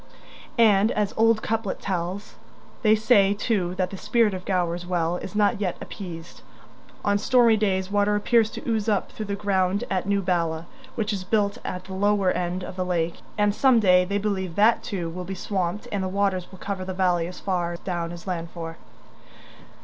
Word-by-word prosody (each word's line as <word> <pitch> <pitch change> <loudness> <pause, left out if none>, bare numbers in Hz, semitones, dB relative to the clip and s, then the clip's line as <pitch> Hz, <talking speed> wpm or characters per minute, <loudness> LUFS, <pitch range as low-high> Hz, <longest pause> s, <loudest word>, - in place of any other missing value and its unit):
And, 215 -2 +5
as 210 -2 0
the - - -17
old 225 0 +3
couplet 225 -3 -2
tells, 185 +2 -3 0.5
they 215 -2 +5
say 210 -2 +4
too 195 -5 -1
that 185 -1 -1
the 195 - -6
spirit 215 +1 +2
of 185 -1 -6
Gower's 175 -2 0
Well 175 -1 0
is 185 - -8
not 210 +1 +2
yet 185 -4 -1
appeased. 170 -4 -8 0.6
On 205 0 +2
stormy 235 0 +4
days 195 -3 0
water 205 0 +2
appears 220 +1 +3
to - - -8
ooze 220 -2 0
up 205 -3 0
through 215 - -6
the 200 - -2
ground 195 -1 0
at 185 0 -1
new 200 -1 +1
Bala, 170 -3 0 0.3
which 220 -3 -1
is 195 -2 -3
built 205 +3 0
at 180 0 -5
the 190 - -9
lower 200 -1 +2
end 180 +1 -2
of 180 - -8
the 185 - 0
lake, 170 -2 -1 0.2
and 205 -1 +3
some 255 +1 +4
day 180 -3 +5
they 200 +2 -1
believe 190 -4 -2
that 220 +3 +4
too 180 -5 -4
will 180 +2 -5
be 190 +2 -5
swamped 185 0 -2
and 200 - -1
the - - -1
waters 190 -2 0
will 190 - -12
cover 195 0 -4
the 185 0 -5
valley 180 -3 +1
as 180 - -9
far 175 -3 -1
down 170 -2 -3
as 175 0 -9
Llanfor. 170 -2 -5
195 Hz, 195 wpm, -25 LUFS, 180-210 Hz, 0.6 s, And